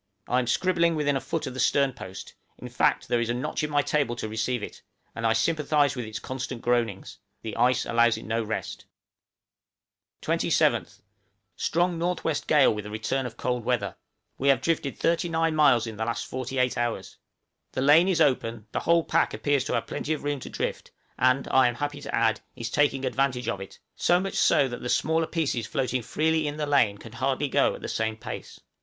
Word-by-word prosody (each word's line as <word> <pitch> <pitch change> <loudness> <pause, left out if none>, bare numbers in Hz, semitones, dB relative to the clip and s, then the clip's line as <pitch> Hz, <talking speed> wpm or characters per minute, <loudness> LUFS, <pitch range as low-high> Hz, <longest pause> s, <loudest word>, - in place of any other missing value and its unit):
I 125 - +2
am 125 - -2
scribbling 170 +3 +2
within 145 -2 +1
a 135 - -1
foot 165 - -3
of 130 - -5
the 130 - -7
sternpost 125 -11 -1 0.2
in - - -8
fact, - - +1
there 120 -1 +1
is 115 - -2
a 120 - 0
notch 125 +4 -3
in 150 - -1
my 145 -1 +2
table 140 -6 0
to 115 - -4
receive 110 +2 -2
it; - - -8 0.3
and 115 0 -1
I 110 - +3
sympathize 145 +3 +2
with 125 -3 -4
its 110 0 -6
constant 130 -1 -6
groanings; 120 -5 -1 0.2
the 110 -2 -5
ice 125 +1 +2
allows 115 0 +3
it - - -9
no 115 +1 -1
rest. 110 +1 -5 1.4
27th. - - +1 0.5
Strong 170 0 0
N.W. 175 -3 0
gale 145 -6 +5
with 105 -1 -6
a - - -7
return 115 +5 -2
of 115 -1 -11
cold 125 -1 -2
weather. 115 -5 -1 0.4
We 140 - 0
have 135 - +5
drifted 155 -5 -1
39 165 -1 +1
miles 130 -7 +4
in 110 -2 -7
the 110 - -2
last 115 0 -2
forty 130 +1 -5
eight 125 -1 +1
hours! 115 -6 -3 0.6
The 130 - -2
lane 155 +6 +6
is 185 -3 +1
open; 120 -7 +1
the - - -1
whole 170 0 +3
pack - - +1
appears 145 -3 +1
to - - -2
have - - 0
plenty 155 - -3
of 155 - -5
room 145 -1 -1
to - - -8
drift, - - -4 0.3
and, 130 +1 +3
I 130 -1 +5
am 120 - -1
happy 145 +1 -4
to 140 0 -3
add, 115 -1 +2
is 115 +1 -5
taking 140 -2 +1
advantage 130 -1 0
of 100 - -2
it, 95 - -10 0.2
so 175 0 +3
much 195 +1 -3
so 140 - +4
that 120 -1 -6
the 125 - -4
smaller 160 +4 +1
pieces 140 -9 -1
floating 130 -3 -1
freely 155 +5 0
in 145 0 -4
the 150 - -1
lane 140 -8 +3
can 110 +2 -12
hardly 135 +4 -1
go - - +2
at - - -11
the - - -3
same 110 0 -2
pace. - - -8
130 Hz, 210 wpm, -26 LUFS, 115-150 Hz, 1.4 s, lane